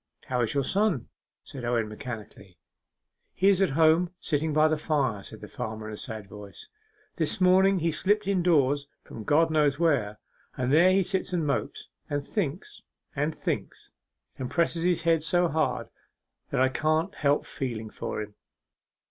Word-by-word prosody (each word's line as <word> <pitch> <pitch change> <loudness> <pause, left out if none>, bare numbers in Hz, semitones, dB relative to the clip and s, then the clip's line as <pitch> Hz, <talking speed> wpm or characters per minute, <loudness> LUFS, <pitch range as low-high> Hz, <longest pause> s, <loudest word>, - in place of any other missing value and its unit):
'How 125 -1 +1
is 115 +3 -1
your 140 - +2
son?' 195 - 0 0.3
said 135 -3 -9
Owen 120 -2 0
mechanically. 105 -5 -9 0.8
'He 190 +2 +4
is 195 -1 +3
at 195 - +3
home, 165 +2 +4
sitting 155 0 -1
by 155 +1 +4
the 155 - +1
fire,' 140 -9 0
said - - -9
the - - -8
farmer, 110 0 -6
in - - -6
a - - -6
sad 110 -2 -5
voice. 100 0 -11 0.5
'This 160 0 -1
morning 190 +1 +5
he 165 +1 +1
slipped 205 +6 +1
indoors 150 -7 +2 0.2
from 110 - -9
God 160 +6 +3
knows 150 -3 +2
where, 135 -11 +1 0.4
and 130 +1 0
there 175 +4 +6
he 195 +1 +3
sits 190 0 -2
and 170 -3 0
mopes, 140 - -2 0.2
and 145 -1 -2
thinks, 195 - -4 0.3
and 150 +2 -1
thinks, - - -4 0.5
and 130 -1 -3
presses 165 +4 +1
his 175 -2 +1
head 165 -1 +3
so 175 +2 +2
hard, 160 0 -1 0.6
that - - -1
I 130 0 +4
can't 155 +6 0
help 145 0 +1
feeling 115 -5 -5
for 110 - -4
him. 105 0 -11
150 Hz, 170 wpm, -27 LUFS, 125-175 Hz, 0.8 s, there